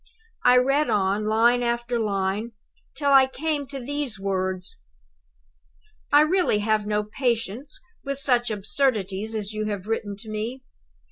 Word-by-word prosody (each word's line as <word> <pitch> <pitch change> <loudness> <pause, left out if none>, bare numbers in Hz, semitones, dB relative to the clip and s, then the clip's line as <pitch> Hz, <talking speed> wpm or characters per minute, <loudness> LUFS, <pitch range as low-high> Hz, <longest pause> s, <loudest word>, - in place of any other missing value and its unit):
I 250 - +6
read 275 +4 +3
on, 205 +1 +1
line 235 +3 +4
after 240 0 -1
line, 205 +1 -1 0.4
till 280 0 +1
I 270 -1 +7
came 290 +1 -2
to 275 +1 -6
these 270 -4 -4
words: 185 - -2 1.3
"'...I 290 0 +7
really 345 - +2
have 210 0 0
no 210 0 +1
patience 235 +3 -2 0.2
with 275 -1 -3
such 245 -3 +1
absurdities 215 -1 0
as 210 -1 -4
you 215 0 -2
have 200 -3 -4
written 215 -2 -2
to 215 +2 -10
me. 230 +5 -4
225 Hz, 140 wpm, -24 LUFS, 210-265 Hz, 1.3 s, I